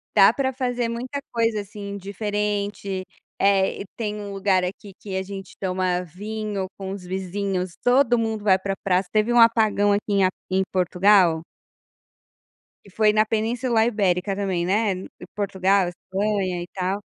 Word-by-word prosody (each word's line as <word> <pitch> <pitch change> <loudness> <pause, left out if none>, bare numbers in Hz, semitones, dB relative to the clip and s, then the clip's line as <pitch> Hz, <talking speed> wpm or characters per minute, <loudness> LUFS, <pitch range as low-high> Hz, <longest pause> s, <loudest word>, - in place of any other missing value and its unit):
Dá 200 +1 +7
para 265 0 0
fazer 245 -2 -1
muita 250 +4 -4
coisa, 225 -2 +1
assim, 200 0 -7
diferente, 200 -1 -3 0.4
eh, 195 -1 +2
e - - -6
tem 210 -2 -3
um 205 -1 -6
lugar 195 -1 +2
aqui 190 +2 -6
que 195 -2 -6
a 190 - 0
gente 195 0 -9
toma 185 -1 0
vinho 205 +2 -4
com 190 -1 -5
os 195 -2 -6
vizinhos, 185 0 -3 0.4
mundo 220 -2 -2
vai 190 -2 +5
para 195 +1 -3
praça, 185 -1 +1
teve 215 +2 +2
um 240 - +4
apagão 220 -3 +4
aqui 205 +1 +2
em 200 -2 +4
a 185 - +4 0.2
em 190 +1 +2
Portugal. 180 -2 +4 1.4
Que - - -16
foi 215 -1 +5
na 215 0 +4
Península 225 +1 +1
Ibérica 195 -3 +1
também, 190 -4 -1
né, 205 +1 +2 0.4
Portugal, 195 -2 +2
Espanha 190 0 -2
e - - -10
tal. 190 +2 -2
200 Hz, 155 wpm, -23 LUFS, 190-215 Hz, 1.4 s, Dá